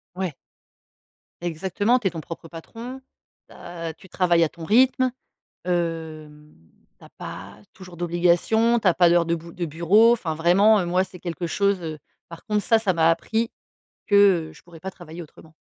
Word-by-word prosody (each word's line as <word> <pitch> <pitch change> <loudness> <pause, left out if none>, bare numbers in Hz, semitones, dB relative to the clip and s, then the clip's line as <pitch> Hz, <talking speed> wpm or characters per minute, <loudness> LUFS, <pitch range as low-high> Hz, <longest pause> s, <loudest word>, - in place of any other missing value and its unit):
Ouais. 185 -4 -3 1.1
Exactement, 190 +8 0
tu 220 - -1
es - - +2
ton 165 -1 -6
propre 165 +1 -9
patron, 230 +11 -9 0.5
tu - - -15
as 170 -2 -7
tu 175 - -18
travailles 175 -2 +2
à 160 - +1
ton 170 - -12
rythme, 255 +6 +3 0.5
hem, 160 -4 -4 0.5
tu - - -17
as - - -14
pas - - -9 0.2
toujours 180 -2 -13
d'obligations, 175 +7 +2
tu 205 - +3
as 175 - +3
pas 175 -1 +5
d'heures 170 0 +3
de 170 - +1
bou 170 +1 -11
de 175 - -4
bureau. 175 +9 +4
Enfin, 180 -9 -2
vraiment, 195 +7 +4
heu, 180 - -2
moi, 180 +2 +1
c'est 185 -2 -14
quelque 175 0 -4
chose, 200 +2 0
heu 160 -2 -5 0.3
par 170 -1 -12
contre, 210 -1 -1
ça, 225 - +4
ça 200 -4 +1
m'a 165 -2 +3
appris 225 +7 -1 0.6
que, 205 - +2 0.3
heu, - - -14
je - - -17
pourrais 170 -2 -15
pas 190 +4 -6
travailler 175 -2 -10
autrement. 160 0 -15
175 Hz, 190 wpm, -23 LUFS, 165-205 Hz, 1.1 s, pas